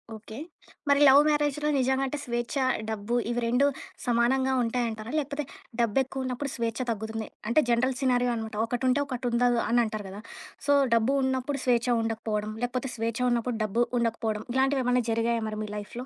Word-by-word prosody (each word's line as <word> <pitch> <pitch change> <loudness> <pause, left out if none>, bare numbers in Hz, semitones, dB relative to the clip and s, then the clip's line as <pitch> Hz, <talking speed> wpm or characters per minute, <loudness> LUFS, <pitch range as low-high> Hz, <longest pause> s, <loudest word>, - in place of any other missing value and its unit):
Okay. 220 0 -10 0.5
మరి 280 0 +5
love 275 +2 +8
మ్యారేజ్‌లో 295 0 +1
నిజంగా 265 +1 +1
అంటే 295 - -3
స్వేచ్ఛ, 240 +2 -3 0.3
డబ్బు 220 +2 -2
ఇవి 240 0 0
రెండూ 245 +4 +3 0.4
సమానంగా 255 +2 +2
ఉంటాయంటారా? 230 -1 -2
లేకపోతే 290 0 -3 0.4
డబ్బు 230 -1 +1
ఎక్కువున్నప్పుడు, 260 +1 -4
స్వేచ్ఛ 230 0 -2
తగ్గుతుంది. 220 0 -4 0.2
అంటే 270 +7 +4
జనరల్ 250 +2 +2
సినారీయో 250 -2 +2
అనమాట. 220 -1 -5
ఒకటుంటే, 250 +3 +1
ఒకటి 250 -2 -3
ఉందదు 240 0 +3
అని 240 +1 +3
అంటారు 215 -2 -4
కదా! 200 +2 -8 0.5
సో, 285 - +5 0.2
డబ్బు 230 +3 +3
ఉన్నప్పుడు 265 +2 -1
స్వేచ్ఛ 240 -1 +2 0.2
ఉండకపోవడం, 215 -1 -2
లేకపోతే 250 +2 -2
స్వేచ్ఛ 230 +1 -2
ఉన్నప్పుడు 240 0 0
డబ్బు 225 +4 +1 0.2
ఉండకపోవడం. 225 -2 -1
ఇలాంటివి 265 +1 +2
ఏమన్నా 250 0 +2
జరిగాయా 230 0 0
మరి 215 0 -5
మీ 210 - -6
లైఫ్‌లో? 235 +4 -7
240 Hz, 160 wpm, -27 LUFS, 225-260 Hz, 0.5 s, love